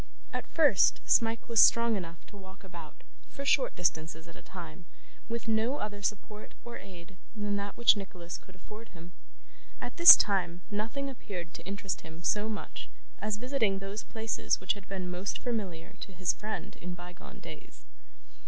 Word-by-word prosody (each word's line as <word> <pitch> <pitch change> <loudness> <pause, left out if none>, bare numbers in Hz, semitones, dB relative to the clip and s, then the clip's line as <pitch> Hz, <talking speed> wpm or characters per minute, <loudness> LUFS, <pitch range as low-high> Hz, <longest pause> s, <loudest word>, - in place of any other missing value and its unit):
At - - -3
first, 290 - +4
Smike 225 -1 +2
was 230 -1 +2
strong 230 -1 +5
enough 170 -4 -7
to - - -16
walk 190 0 -13
about, 170 -5 -11 0.3
for 280 - -7
short 275 -1 +3
distances 160 -1 -1
at 165 - -13
a - - -12
time, 175 -1 -10 0.4
with 235 0 -4
no 225 +5 +1
other 205 -3 -5
support 210 +1 -4
or 235 0 -7
aid 180 -1 -13 0.2
than 205 -1 -2
that 200 0 -5
which 235 -1 +6
Nicholas 180 -4 -7
could 185 - -18
afford 215 +4 -12
him. 170 +2 -12 0.7
At - - -7
this 340 0 +13
time, 180 -4 0
nothing 225 +7 -2
appeared 185 -10 -7
to - - -9
interest 200 -1 -3
him 160 +1 -11
so 210 +4 +1
much 215 - -6 0.3
as 210 0 -2
visiting 235 -5 0
those 195 +2 -5
places 225 0 -1
which - - +1
had 205 -1 -13
been 185 -2 -4
most 180 +3 -3
familiar 200 -9 -4
to 195 - -8
his 180 -1 0
friend 215 +1 -6
in 180 0 -6
bygone 175 0 -11
days. - - -12
200 Hz, 170 wpm, -30 LUFS, 180-220 Hz, 0.7 s, this